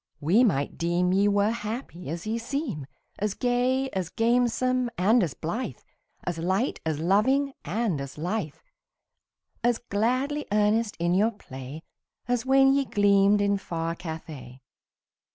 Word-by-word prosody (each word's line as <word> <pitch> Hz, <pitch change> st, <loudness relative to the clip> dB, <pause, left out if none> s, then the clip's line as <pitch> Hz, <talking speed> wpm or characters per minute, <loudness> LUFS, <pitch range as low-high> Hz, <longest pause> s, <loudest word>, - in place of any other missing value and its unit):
we 185 Hz, -, +4 dB
might 145 Hz, -, 0 dB
deem 175 Hz, +2 st, +1 dB
Ye 200 Hz, +2 st, +3 dB
were 205 Hz, +1 st, +3 dB
happy 215 Hz, -, -5 dB
as 165 Hz, +2 st, -5 dB
ye 225 Hz, +2 st, -1 dB
seem 230 Hz, -, -4 dB, 0.3 s
As 210 Hz, -1 st, -1 dB
gay, 250 Hz, +2 st, +1 dB
as 185 Hz, -3 st, -3 dB
gamesome, 245 Hz, +2 st, +1 dB
and 220 Hz, +7 st, +4 dB
as 170 Hz, -7 st, -1 dB
blithe, 215 Hz, +11 st, -4 dB, 0.5 s
As 175 Hz, -2 st, -3 dB
light, 190 Hz, +9 st, 0 dB
as 155 Hz, -2 st, -1 dB
loving, 260 Hz, -, +2 dB
and 190 Hz, -3 st, -1 dB
as 140 Hz, +1 st, -8 dB
lithe, 175 Hz, -1 st, -2 dB, 1.1 s
As 240 Hz, -1 st, +3 dB
gladly 255 Hz, +7 st, -1 dB
earnest 210 Hz, +1 st, +2 dB
in 175 Hz, +1 st, +1 dB
your 205 Hz, +5 st, +3 dB
play, 140 Hz, -, -9 dB, 0.4 s
As 245 Hz, 0 st, -1 dB
when 270 Hz, 0 st, +5 dB
ye 280 Hz, 0 st, +2 dB
gleamed 205 Hz, -1 st, +4 dB
in 200 Hz, 0 st, +1 dB
far 165 Hz, -3 st, -3 dB
Cathay. 160 Hz, -7 st, -8 dB
205 Hz, 140 wpm, -26 LUFS, 170-240 Hz, 1.1 s, when